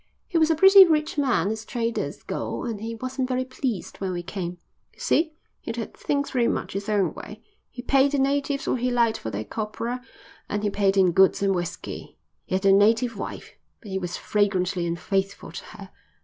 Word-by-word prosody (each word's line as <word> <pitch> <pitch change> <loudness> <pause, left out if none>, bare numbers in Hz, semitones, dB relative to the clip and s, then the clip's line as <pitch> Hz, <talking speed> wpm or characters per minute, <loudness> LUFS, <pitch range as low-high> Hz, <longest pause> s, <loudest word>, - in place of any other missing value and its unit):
He 340 - +1
was 315 0 +4
a 325 - +3
pretty 385 +4 +9
rich 310 -3 +1
man 255 -7 +2
as 220 0 -4
traders 230 0 -3
go - - -4
and 220 -4 -4
he 230 +1 -4
wasn't 255 +2 -3
very 255 0 0
pleased 255 -5 -4
when 190 -2 -3
we 175 0 -4
came. 180 -1 -5 0.4
You - - -24
see, 320 0 +1 0.3
he'd - - -5
had - - -5
things 285 -1 -1
very 240 -3 +2
much - - -2
his 200 +2 -4
own 200 -5 +1
way. 215 +1 -10 0.3
He 245 - -9
paid 275 +2 +3
the - - +2
natives 275 +1 0
what 250 - 0
he 250 - +1
liked 235 -2 +2
for 110 - -5
their 110 0 -4
copra, 225 - -4 0.5
and 210 0 -2
he 205 - +1
paid 195 -1 +2
in 185 -2 +5
goods 190 +2 +4
and 195 -1 +3
whiskey. 175 0 -5 0.3
He - - -2
had 190 +1 -1
a 195 - +7
native 225 +4 +4
wife, 200 - -7 0.3
but 205 - -11
he 190 - -1
was 175 -1 -4
flagrantly 185 -4 0
unfaithful 195 +4 -2
to - - -8
her. 200 -3 -11
215 Hz, 205 wpm, -25 LUFS, 195-260 Hz, 0.5 s, pretty